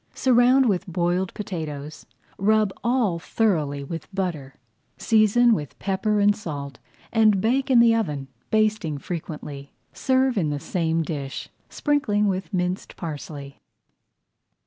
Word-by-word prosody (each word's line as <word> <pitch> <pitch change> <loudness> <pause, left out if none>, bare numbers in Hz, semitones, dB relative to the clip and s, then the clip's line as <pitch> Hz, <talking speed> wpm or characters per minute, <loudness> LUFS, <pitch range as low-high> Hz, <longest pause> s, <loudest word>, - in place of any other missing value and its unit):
Surround 255 +1 +4
with 195 -4 0
boiled 175 +1 0
potatoes, 155 -7 -6 0.3
rub 215 0 +2
all 235 -8 +1
thoroughly 155 -9 0
with 165 +3 -6
butter, 170 -9 -3 0.4
season 225 +2 +4
with 150 -9 -4
pepper 205 +2 0
and 205 0 +4
salt, 140 -9 -6 0.3
and 215 -3 +4
bake 255 +7 +1
in 250 -3 +6
the 235 -1 +6
oven, 150 -12 -2 0.2
basting 215 -8 +1
frequently. 150 -3 -7 0.2
Serve 260 -3 +1
in 160 -5 0
the 145 -1 -2
same 165 0 -1
dish, 140 -3 -5 0.2
sprinkling 245 -9 +1
with 190 +1 -2
minced 180 -1 -2
parsley. 145 -3 -7
190 Hz, 125 wpm, -24 LUFS, 155-220 Hz, 0.4 s, in